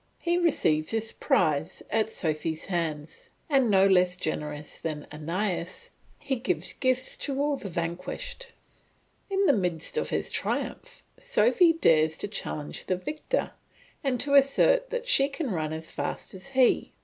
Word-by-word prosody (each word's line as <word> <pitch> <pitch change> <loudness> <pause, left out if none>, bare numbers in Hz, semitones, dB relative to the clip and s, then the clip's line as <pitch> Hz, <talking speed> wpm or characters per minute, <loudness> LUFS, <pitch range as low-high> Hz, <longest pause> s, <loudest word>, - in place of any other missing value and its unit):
He 345 +1 0
receives 155 - +2
his 225 0 -1
prize 155 - 0
at 220 -1 +1
Sophy's 160 -4 -2
hands, 165 -4 -4 0.2
and 270 -6 +3
no 195 -1 +5
less 180 -2 +4
generous 150 -3 -4
than 155 -2 -4
Aeneas, 170 +4 -3 0.3
he 270 -2 -2
gives 235 - 0
gifts 255 0 +1
to 275 -1 -3
all 290 0 +1
the 205 -7 -7
vanquished. 180 - -4 0.8
In 390 0 +1
the 285 - +5
midst 180 - -1
of - - 0
his - - -1
triumph, - - -3 0.2
Sophy 435 -8 +4
dares 160 - +3
to - - -4
challenge 155 -7 -4
the 185 - +1
victor, 305 - -2 0.5
and 260 -3 0
to 280 - -1
assert 280 - +4
that - - -4
she 275 - +4
can 280 -3 -3
run 155 -4 -2
as 160 0 -6
fast - - -4
as 190 +4 -8
he. 265 -2 +2
205 Hz, 150 wpm, -27 LUFS, -, 0.8 s, no